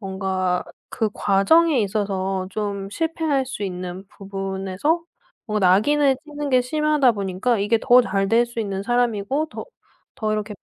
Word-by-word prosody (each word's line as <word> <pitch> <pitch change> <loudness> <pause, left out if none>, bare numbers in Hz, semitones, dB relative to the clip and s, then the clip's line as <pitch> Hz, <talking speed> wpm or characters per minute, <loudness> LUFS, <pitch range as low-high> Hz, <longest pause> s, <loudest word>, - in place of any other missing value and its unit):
뭔가 190 -2 -1 0.3
그 220 -3 -1
과정에 265 +9 +3
있어서 195 -2 -1
좀 200 -1 -3
실패할 315 0 -1
수 230 -5 -6
있는 185 0 -6
부분에서 195 - -3 0.4
뭔가 210 -3 +1
낙인을 275 +8 +3
찍는 295 -1 -5
게 255 -1 +5
심하다 300 -1 +2
보니까 200 +3 -1
이게 210 +3 +2
더 250 -1 +7
잘될 225 +1 +1
수 235 -1 -5
있는 195 -2 -3
사람이고 240 +4 0
더 - - -7 0.6
더 215 0 0
이렇게 215 0 -3
210 Hz, 290 characters per minute, -22 LUFS, 195-260 Hz, 0.6 s, 더